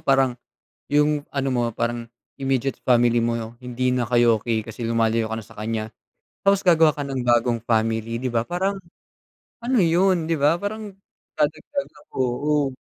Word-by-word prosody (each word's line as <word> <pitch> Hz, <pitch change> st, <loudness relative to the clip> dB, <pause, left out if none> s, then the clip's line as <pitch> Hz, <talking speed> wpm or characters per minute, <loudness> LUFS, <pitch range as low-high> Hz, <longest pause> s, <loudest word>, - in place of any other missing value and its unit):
parang, 135 Hz, -2 st, +3 dB, 0.6 s
yung 150 Hz, 0 st, +3 dB
ano 135 Hz, -1 st, -1 dB
mo, 120 Hz, -2 st, +1 dB
parang 120 Hz, +1 st, -2 dB, 0.3 s
immediate 135 Hz, -1 st, -1 dB
family 120 Hz, -1 st, +3 dB
mo, 115 Hz, 0 st, -2 dB
hindi 125 Hz, +1 st, -1 dB
na 125 Hz, -, +1 dB
kayo 120 Hz, -1 st, +4 dB
okey 115 Hz, 0 st, -1 dB
kasi 115 Hz, +1 st, -7 dB
lumalayo 115 Hz, -1 st, +1 dB
ka -, -, -1 dB
na 110 Hz, -, -11 dB
sa -, -, -16 dB
kanya. 110 Hz, 0 st, -3 dB, 0.6 s
Tapos 195 Hz, 0 st, +4 dB
gagawa 165 Hz, -2 st, +6 dB
ka 145 Hz, -2 st, -5 dB
ng 135 Hz, -2 st, -3 dB
bagong 120 Hz, -1 st, +2 dB
family, 115 Hz, 0 st, 0 dB
di 130 Hz, -, -3 dB
ba, 115 Hz, -2 st, +1 dB
parang, 185 Hz, +7 st, -1 dB, 0.8 s
ano 240 Hz, +1 st, 0 dB
yun, 170 Hz, -1 st, +2 dB
di 160 Hz, -, +1 dB
ba? 145 Hz, +3 st, +4 dB
Parang 210 Hz, 0 st, -5 dB, 0.4 s
dadagdag 155 Hz, -, -1 dB, 0.3 s
oo. 135 Hz, +3 st, 0 dB
125 Hz, 160 wpm, -23 LUFS, 115-150 Hz, 0.8 s, gagawa